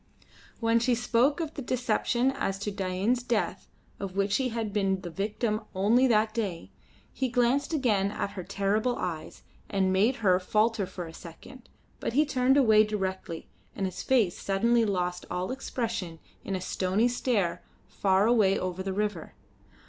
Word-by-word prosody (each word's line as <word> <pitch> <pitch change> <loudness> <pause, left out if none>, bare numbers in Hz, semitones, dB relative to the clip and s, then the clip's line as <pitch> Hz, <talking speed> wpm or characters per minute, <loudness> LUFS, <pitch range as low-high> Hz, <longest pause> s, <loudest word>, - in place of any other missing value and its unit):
When 230 0 +3
she 240 +1 +2
spoke 245 +5 +2
of 320 -2 -3
the 285 - -6
deception 250 0 +1
as 270 -8 -2
to 205 +1 -3
Dain's 195 +5 0
death 235 -2 -2 0.3
of 190 -2 -5
which 200 0 +1
he 265 -2 0
had 225 -3 -3
been 195 -2 +1
the 175 - -7
victim 210 +4 -1
only 225 +7 +4
that 215 -2 +2
day, 185 - -3 0.4
he 260 -1 -1
glanced 245 +4 +1
again 220 -10 +1
at 200 -1 -3
her 185 - -6
with - - -14
terrible 210 +5 +1
eyes, 165 -3 -5 0.3
and 190 -1 +1
made 215 +7 +3
her 185 -1 +5
falter 210 +1 +1
for 180 -1 -6
a 165 - -10
second, 195 +10 -12 0.3
but - - -3
he 300 +4 +4
turned 265 -1 +2
away 220 -6 +6
directly, 190 -5 -4 0.3
and 195 - -1
his 185 - -4
face 230 -9 +2
suddenly 230 +4 +2
lost 180 -3 -2
all 180 +5 -2
expression 230 -10 -3 0.3
in 195 - -3
a 185 - -3
stony 190 +5 +1
stare 240 -7 0 0.3
far 195 0 +2
away 215 -5 +4
over 185 0 -3
the 190 0 -3
river. 205 -4 -3
210 Hz, 170 wpm, -28 LUFS, 190-240 Hz, 0.4 s, away